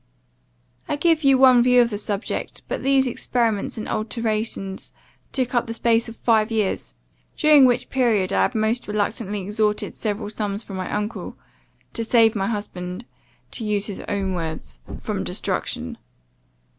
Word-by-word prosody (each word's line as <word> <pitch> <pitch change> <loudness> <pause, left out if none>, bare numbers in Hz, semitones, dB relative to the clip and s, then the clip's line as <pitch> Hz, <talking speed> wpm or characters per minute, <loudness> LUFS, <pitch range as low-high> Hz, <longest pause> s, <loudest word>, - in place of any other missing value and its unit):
"I - - +1
give 320 +1 +2
you 275 -1 +6
one 255 -2 +7
view 250 0 +5
of 235 -1 +4
the 205 - -2
subject; 205 0 -3
but - - -3
these 270 0 +3
experiments 230 -4 -1
and 215 - -4
alterations 215 -3 -2 0.4
took 255 -2 -1
up 240 -1 +1
the 230 - -4
space 230 0 +2
of 230 - -9
five 220 -2 +2
years; 215 -4 -1 0.4
during 300 -3 +7
which 245 -1 +1
period, 220 -8 +2
I - - +3
had 250 - +1
most 220 +3 0
reluctantly 210 -1 -2
extorted 210 +1 0
several 210 -1 -3
sums 210 0 -3
from 195 -3 -7
my 185 - -4
uncle, 210 -2 -4 0.6
to 230 - -2
save 225 -1 +4
my 195 -1 0
husband, 205 -2 -5 0.5
to 230 - -4
use 205 -2 0
his 200 -2 -5
own 195 -2 -1
words, 160 - -5 0.2
from - - -3
destruction. - - -3
220 Hz, 155 wpm, -23 LUFS, 205-240 Hz, 0.6 s, one